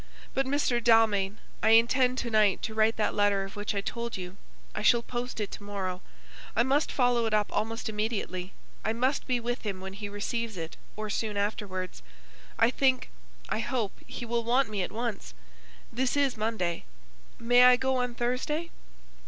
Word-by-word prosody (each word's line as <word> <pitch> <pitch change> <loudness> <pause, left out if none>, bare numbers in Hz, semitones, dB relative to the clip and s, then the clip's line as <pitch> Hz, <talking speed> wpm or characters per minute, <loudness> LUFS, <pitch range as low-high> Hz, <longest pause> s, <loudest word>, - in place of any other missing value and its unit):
But, 270 0 0
Mr. 265 -4 +1
Dalmain, 220 -3 +4 0.2
I 225 +1 +7
intend 250 +2 +3
to 235 - -2
night 215 -3 +3
to 225 - -3
write 220 +1 +3
that 215 - 0
letter 205 -1 +2
of 195 - -8
which 205 +1 -3
I 200 - 0
told 235 +2 -4
you. 180 0 -7 0.4
I - - -3
shall 235 +3 +4
post 245 0 -4
it 210 - -3
to - - -8
morrow. 190 -3 -4 0.5
I - - +4
must 275 +5 +1
follow 245 -3 +2
it 215 - +1
up 210 -1 +1
almost 225 +2 -2
immediately. 210 -4 -3 0.3
I 220 - 0
must 255 +4 0
be 250 -2 +1
with 245 +1 -3
him 200 -4 -4
when 190 +1 -7
he 205 +1 -6
receives 220 +1 -3
it, 165 -1 -5 0.2
or 215 -1 -4
soon 215 -1 -2
afterwards. 200 - -3 0.6
I 230 +2 +4
think 260 -1 +1 0.4
I - - 0
hope 225 -3 -1 0.2
he 240 - -6
will 235 0 -1
want 245 +1 +2
me 205 -2 -1
at 180 - -3
once. 220 - -4 0.6
This 260 +3 0
is 280 -3 +2
Monday. 215 -6 -2 0.5
May 245 +2 +6
I 250 0 +8
go 265 +1 0
on 250 -1 -1
Thursday?" 260 +8 -1
225 Hz, 185 wpm, -29 LUFS, 205-245 Hz, 0.6 s, I